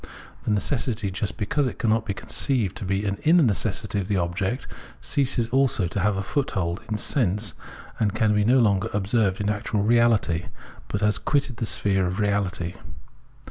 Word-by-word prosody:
The -, -, -1 dB
necessity, 110 Hz, -1 st, -1 dB
just 100 Hz, +2 st, -3 dB
because 135 Hz, +7 st, 0 dB
it -, -, -5 dB
cannot 110 Hz, 0 st, +1 dB
be 100 Hz, -, -2 dB
conceived 115 Hz, -7 st, 0 dB
to -, -, -5 dB
be 95 Hz, +2 st, -1 dB
an 100 Hz, -1 st, -2 dB
inner 165 Hz, +1 st, +5 dB
necessity 105 Hz, -2 st, 0 dB
of 95 Hz, -, -3 dB
the 100 Hz, -2 st, 0 dB
object, 95 Hz, +8 st, -1 dB, 0.3 s
ceases 135 Hz, -5 st, 0 dB
also 130 Hz, -7 st, +2 dB
to 85 Hz, -, -3 dB
have 100 Hz, +1 st, +1 dB
a 95 Hz, -, -2 dB
foothold 95 Hz, -, -2 dB
in 110 Hz, -, -1 dB
sense, 105 Hz, -, 0 dB, 0.5 s
and 105 Hz, -2 st, +2 dB
can 110 Hz, -1 st, +2 dB
be 105 Hz, 0 st, +2 dB
no 125 Hz, +5 st, +4 dB
longer 105 Hz, -3 st, +2 dB
observed 100 Hz, -1 st, +1 dB
ia 105 Hz, -, +2 dB
actual 105 Hz, -1 st, -2 dB
reahty, 110 Hz, -7 st, +2 dB, 0.4 s
but 100 Hz, -, -3 dB
has 105 Hz, 0 st, +2 dB
quitted 140 Hz, -3 st, 0 dB
the 115 Hz, -, -2 dB
sphere 95 Hz, -3 st, +1 dB
of 90 Hz, -, -2 dB
reahty. 100 Hz, -4 st, -1 dB
105 Hz, 180 wpm, -24 LUFS, 95-115 Hz, 0.5 s, inner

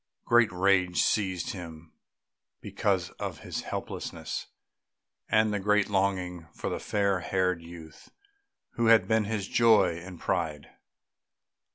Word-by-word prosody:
Great 120 Hz, -3 st, +4 dB
rage 90 Hz, -1 st, +2 dB
seized 95 Hz, -5 st, 0 dB
him 85 Hz, -4 st, -10 dB, 0.7 s
because -, -, -1 dB
of -, -, -5 dB
his -, -, -4 dB
helplessness, -, -, -5 dB, 0.8 s
and 110 Hz, -1 st, +3 dB
a 105 Hz, -, -1 dB
great 105 Hz, +1 st, +2 dB
longing 95 Hz, -4 st, -1 dB
for -, -, -4 dB
the -, -, -3 dB
fair 100 Hz, -2 st, 0 dB
haired 90 Hz, -1 st, 0 dB
youth 85 Hz, -2 st, -12 dB, 0.6 s
who 115 Hz, -1 st, 0 dB
had 115 Hz, -1 st, +6 dB
been 110 Hz, -1 st, +2 dB
his 105 Hz, -2 st, -3 dB
joy 110 Hz, -5 st, +4 dB
and 90 Hz, 0 st, -10 dB
pride. 80 Hz, -5 st, -2 dB
95 Hz, 125 wpm, -28 LUFS, 90-105 Hz, 0.8 s, had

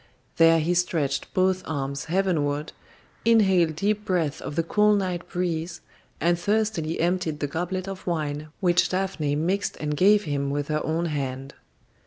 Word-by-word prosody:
There 165 Hz, 0 st, +6 dB
he 165 Hz, +3 st, +1 dB
stretched 160 Hz, -6 st, -1 dB
both 185 Hz, 0 st, +2 dB
arms 140 Hz, -2 st, -3 dB
heavenward, 155 Hz, -5 st, 0 dB, 0.5 s
inhaled 190 Hz, -8 st, +4 dB
deep 210 Hz, +5 st, 0 dB
breaths 175 Hz, -8 st, -1 dB
of 145 Hz, -, -6 dB
the 165 Hz, -, +1 dB
cool 210 Hz, +5 st, +3 dB
night 180 Hz, -3 st, -2 dB
breeze, 175 Hz, -1 st, -3 dB, 0.4 s
and 170 Hz, 0 st, +2 dB
thirstily 205 Hz, -5 st, 0 dB
emptied 170 Hz, -3 st, 0 dB
the 145 Hz, -, -1 dB
goblet 180 Hz, +5 st, -3 dB
of 195 Hz, -1 st, -7 dB
wine 155 Hz, -3 st, -2 dB
which 175 Hz, -2 st, +3 dB
Daphne 185 Hz, -6 st, -1 dB
mixed 180 Hz, +7 st, -1 dB
and 150 Hz, -1 st, -2 dB
gave 205 Hz, +6 st, +5 dB
him 140 Hz, -4 st, -2 dB
with 145 Hz, +1 st, -2 dB
her 155 Hz, 0 st, 0 dB
own 165 Hz, +2 st, -1 dB
hand. 135 Hz, -3 st, -4 dB
170 Hz, 155 wpm, -25 LUFS, 150-185 Hz, 0.5 s, There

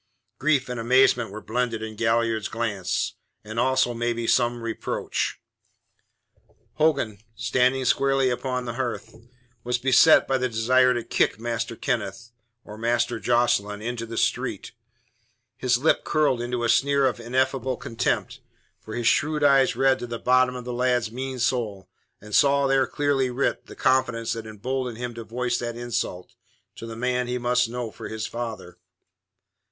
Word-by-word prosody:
Grief 140 Hz, -2 st, +2 dB
and 125 Hz, -2 st, -4 dB
amazement 120 Hz, -1 st, +3 dB
were 105 Hz, +2 st, -9 dB
blended 115 Hz, -3 st, -2 dB
in 110 Hz, 0 st, -6 dB
Galliard's 115 Hz, -1 st, +1 dB
glance, 105 Hz, -6 st, -2 dB, 0.3 s
and 110 Hz, +2 st, -5 dB
also, 130 Hz, 0 st, +2 dB
maybe, 120 Hz, 0 st, -2 dB
some 120 Hz, 0 st, +1 dB
reproach. 115 Hz, -1 st, -3 dB, 1.4 s
Hogan, 140 Hz, -10 st, +1 dB, 0.2 s
standing 130 Hz, +3 st, +1 dB
squarely 135 Hz, 0 st, +2 dB
upon 125 Hz, 0 st, -2 dB
the 120 Hz, -, -4 dB
hearth, 120 Hz, -3 st, -4 dB, 0.5 s
was 125 Hz, 0 st, 0 dB
beset 135 Hz, +5 st, +5 dB
by 135 Hz, 0 st, +1 dB
the 125 Hz, 0 st, 0 dB
desire 125 Hz, +3 st, +3 dB
to 120 Hz, -, -2 dB
kick -, -, 0 dB
Master 115 Hz, 0 st, -3 dB
Kenneth, 120 Hz, 0 st, -3 dB, 0.3 s
or 105 Hz, +1 st, -11 dB
Master 120 Hz, 0 st, 0 dB
Jocelyn, 110 Hz, -4 st, +1 dB
into 115 Hz, 0 st, -4 dB
the 115 Hz, 0 st, -6 dB
street. -, -, -1 dB, 0.8 s
His 125 Hz, -1 st, +1 dB
lip 150 Hz, +6 st, +2 dB
curled 145 Hz, -5 st, +1 dB
into 120 Hz, 0 st, -2 dB
a -, -, +2 dB
sneer 140 Hz, +4 st, +3 dB
of 125 Hz, -2 st, 0 dB
ineffable 130 Hz, +1 st, -1 dB
contempt, 115 Hz, 0 st, -2 dB, 0.4 s
for 110 Hz, -, -8 dB
his 120 Hz, -, -3 dB
shrewd 150 Hz, +5 st, +2 dB
eyes 135 Hz, -2 st, +4 dB
read 135 Hz, 0 st, +3 dB
to 120 Hz, -, -5 dB
the 120 Hz, 0 st, -4 dB
bottom 125 Hz, +1 st, +3 dB
of 125 Hz, -1 st, -7 dB
the 125 Hz, -, -4 dB
lad's 125 Hz, -2 st, +1 dB
mean 130 Hz, +2 st, -5 dB
soul 115 Hz, -6 st, -1 dB, 0.3 s
and 105 Hz, +1 st, -12 dB
saw 140 Hz, +3 st, +4 dB
there 135 Hz, -1 st, +3 dB
clearly 140 Hz, -3 st, 0 dB
writ 125 Hz, +3 st, -1 dB
the -, -, -11 dB
confidence 125 Hz, -3 st, +1 dB
that 115 Hz, -1 st, -6 dB
emboldened 125 Hz, +3 st, -4 dB
him 120 Hz, 0 st, -5 dB
to 115 Hz, 0 st, -7 dB
voice 120 Hz, +2 st, -2 dB
that 120 Hz, -1 st, -4 dB
insult 120 Hz, -6 st, -4 dB, 0.4 s
to 115 Hz, -, -7 dB
the 115 Hz, -, -7 dB
man 125 Hz, +1 st, -1 dB
he 125 Hz, 0 st, -2 dB
must 125 Hz, -1 st, +1 dB
know 120 Hz, -1 st, -4 dB
for -, -, -8 dB
his 110 Hz, -1 st, -4 dB
father. 115 Hz, -6 st, -6 dB
120 Hz, 160 wpm, -25 LUFS, 115-130 Hz, 1.4 s, beset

